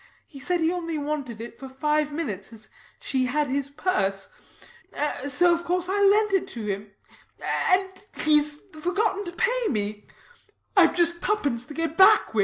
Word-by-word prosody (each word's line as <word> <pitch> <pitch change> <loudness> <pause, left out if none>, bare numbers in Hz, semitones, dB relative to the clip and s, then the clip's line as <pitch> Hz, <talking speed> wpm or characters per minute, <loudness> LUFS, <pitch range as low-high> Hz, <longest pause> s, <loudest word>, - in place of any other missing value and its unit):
He 280 - -13
said 350 +5 -1
he 325 +1 +2
only 335 -3 -3
wanted 285 -6 -4
it 235 +1 -9
for 270 - -8
five 300 +2 0
minutes, 220 - -5
as 220 -1 -13 0.3
she 260 -2 -1
had 290 +2 0
his 280 0 -1
purse. 195 - -1 1.0
So 345 +6 +4
of 340 0 -2
course 360 +1 -1
I 405 +1 +1
lent 415 +1 +4
it 380 -1 +1
to 225 -2 -5
him. 200 0 -4 0.8
And 380 +1 0 0.2
he's 300 0 +2 0.2
forgotten 400 +3 0
to 345 - -5
pay 485 +6 0
me. 210 -3 -3 0.7
I've 355 -4 +5
just 340 0 +3
tuppence 280 - -1
to 295 - -10
get 330 -1 -3
back 390 - +6
with. 220 - 0
305 Hz, 170 wpm, -25 LUFS, 260-365 Hz, 1.0 s, back